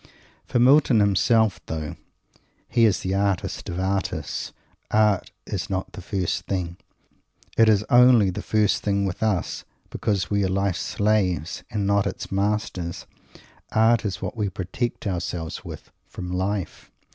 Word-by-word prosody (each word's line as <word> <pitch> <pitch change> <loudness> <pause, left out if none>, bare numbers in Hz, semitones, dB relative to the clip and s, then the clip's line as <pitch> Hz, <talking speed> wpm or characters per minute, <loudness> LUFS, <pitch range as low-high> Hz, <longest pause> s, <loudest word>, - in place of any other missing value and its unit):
For 130 - 0
Milton 130 -1 +5
himself, 105 0 +3
though 80 -1 -4 0.7
he 115 -1 +3
is 105 -4 +2
the 95 - -2
artist 100 -1 -1
of 85 - -3
artists, 95 0 -2 0.4
art 105 -3 +2 0.2
is - - -4
not 95 -1 -3
the - - -9
first 90 -2 -2
thing. 90 -3 -2 0.8
It 115 -1 +5
is 105 -1 +3
only 120 -5 +6
the - - -5
first 105 -2 +1
thing 100 -1 0
with 95 -2 -4
us 105 -6 -1 0.3
because 100 -3 -1
we 100 -1 +2
are - - +2
life's 95 -1 0
slaves, 95 -7 0
and 105 -2 -2
not 100 0 +2
its - - -6
masters. 100 -4 -2 0.7
Art 115 +1 +4
is 100 -3 -3
what - - -4
we 105 -3 -1
protect 95 +7 -4
ourselves 85 -4 -3
with - - -10 0.2
from 90 -1 -7
life. 95 0 -3
100 Hz, 145 wpm, -24 LUFS, 90-110 Hz, 0.8 s, only